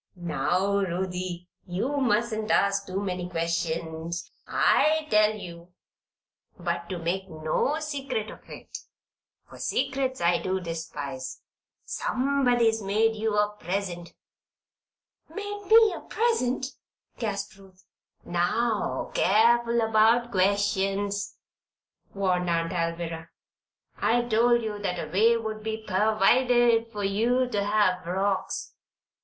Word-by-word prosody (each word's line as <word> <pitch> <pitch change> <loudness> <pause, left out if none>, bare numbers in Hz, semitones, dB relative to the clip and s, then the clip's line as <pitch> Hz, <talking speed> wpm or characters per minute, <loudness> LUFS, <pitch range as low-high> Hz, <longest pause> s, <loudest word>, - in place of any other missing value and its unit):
"Now 180 +4 0
Ruthie, 180 -1 -3 0.2
you 220 +11 -2
mustn't 220 -4 0
ask 200 0 +2
too 190 +1 -2
many 180 -2 -3
questions, 165 0 -3 0.2
I 310 0 +3
tell 215 0 +4
you. 175 -3 -10 0.8
But 170 -1 -3
to 185 - -3
make 185 +3 -3
no 155 - -1
secret 275 -8 -3
of - - -15
it, - - -11 0.7
for - - -13
secrets 265 -1 -1
I 170 0 +2
do 190 0 -1
despise, 145 -6 -6 0.4
somebody's 245 -4 +1
made 215 +3 +1
you 215 -1 -1
a 210 0 +2
present." 175 -2 -4 1.1
"Made 410 0 -6
me 445 -1 +7
a - - -7
present?" 425 - 0 0.5
gasped 205 -2 -3
Ruth. 190 -1 -19 0.4
"Now, 210 +6 0
careful 235 +3 +3
about 225 +2 +3
questions," 200 +1 0 0.7
warned 180 -3 0
Aunt 165 0 0
Alvirah. 165 -1 -3 0.7
"I 240 +1 +2
told 240 +1 +3
you 210 -2 -4
that 185 -3 -2
a - - -14
way 225 +5 +4
would 220 -1 -5
be 220 0 -4
pervided 230 +3 +3
for 205 -2 -4
you 235 +6 +1
to 205 -4 0
have 205 -3 +2
frocks. 190 +2 -2
200 Hz, 115 wpm, -27 LUFS, 180-230 Hz, 1.1 s, me